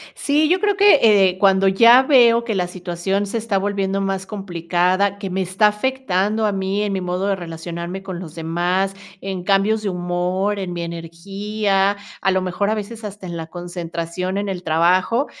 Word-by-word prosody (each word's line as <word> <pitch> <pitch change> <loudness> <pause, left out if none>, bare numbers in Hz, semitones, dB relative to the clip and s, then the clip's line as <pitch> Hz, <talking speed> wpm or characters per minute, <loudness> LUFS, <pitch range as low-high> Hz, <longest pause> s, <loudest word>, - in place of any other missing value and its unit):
Sí, 300 +2 +1
yo 365 +2 +2
creo 410 -2 +1
que, 400 -6 +6 0.3
eh, 180 - -10
cuando 195 0 +4
ya 230 +6 +7
veo 240 -4 +5
que 220 -3 -2
la 180 -2 0
situación 180 +2 -3
se 215 +4 -3
está 215 -3 -1
volviendo 195 -1 -1
más 195 -1 -2
complicada, 185 0 -1
que 195 -2 -5
me 190 +1 -1
está 190 +4 +2
afectando 215 -2 -1
a 205 - 0
mí 195 +1 -1
en 205 -1 -1
mi 190 - -2
modo 180 +1 -2
de 195 - +1
relacionarme 170 +2 -6
con 185 -2 -6
los 165 -3 -9
demás, 175 +4 -1 0.3
en 190 -2 -5
cambios 205 +3 +2
de 205 - -2
humor, 180 +3 -1
en 185 -2 -4
mi 170 -1 -4
energía, 195 +4 -2 0.2
a 195 - +2
lo 190 - +1
mejor 195 +3 -1
a - - +1
veces 220 +1 -7
hasta 200 -2 -8
en 170 -1 -6
la 165 -1 -5
concentración 175 +1 -5
en 205 0 -3
el 180 -2 -4
trabajo. 180 - +2
195 Hz, 190 wpm, -20 LUFS, 180-210 Hz, 0.3 s, ya